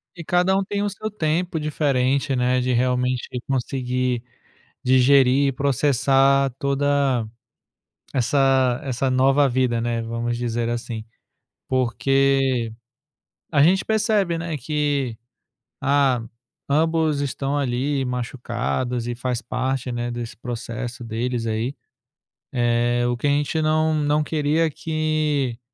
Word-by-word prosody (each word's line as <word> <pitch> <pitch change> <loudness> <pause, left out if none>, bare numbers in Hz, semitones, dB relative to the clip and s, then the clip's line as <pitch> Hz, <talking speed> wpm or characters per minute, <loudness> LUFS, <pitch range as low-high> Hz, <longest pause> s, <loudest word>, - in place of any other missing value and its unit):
E 170 - -8
cada 180 +3 +2
um 195 - +1
tem 205 +1 -2
o 205 - 0
seu 215 +2 -5
tempo 170 -2 -1
diferente, 140 -2 0
né, 125 +1 +2
de, 125 0 0
realmente, 125 0 0 0.2
conseguir 125 -2 -1 0.6
digerir, 130 +1 +4
processar 135 0 +2
toda, 140 -3 +1 0.9
essa 130 -1 +2
essa 130 0 -1
nova 135 +2 +4
vida, 125 -2 +1
né, 115 0 -1
vamos 115 +1 -3
dizer 120 -1 -2
assim, 115 -2 -4 0.6
porque 130 -1 +1 0.8
a 145 -3 +2
gente 185 +4 +4
percebe, 205 -5 +1
né, 165 -1 -3
que, 145 -4 -1 0.6
ah, 135 -4 +2 0.5
ambos 160 0 +2
estão 140 +1 -2
ali 135 +1 0
machucados 125 0 -3
e 120 - -2
faz 125 0 -3
parte, 130 +2 -2
né, 120 0 -3
desse 120 -3 -6
processo 120 0 -6
deles, 115 +1 -2
aí, 115 +5 -2 0.8
eh 120 0 +1
o 120 - -1
que 135 - -1
a - - +3
gente 145 +3 +1
não 155 +1 +2
não 150 0 +1
queria 155 +1 +1
que 155 -6 -1
135 Hz, 120 wpm, -22 LUFS, 120-145 Hz, 0.9 s, digerir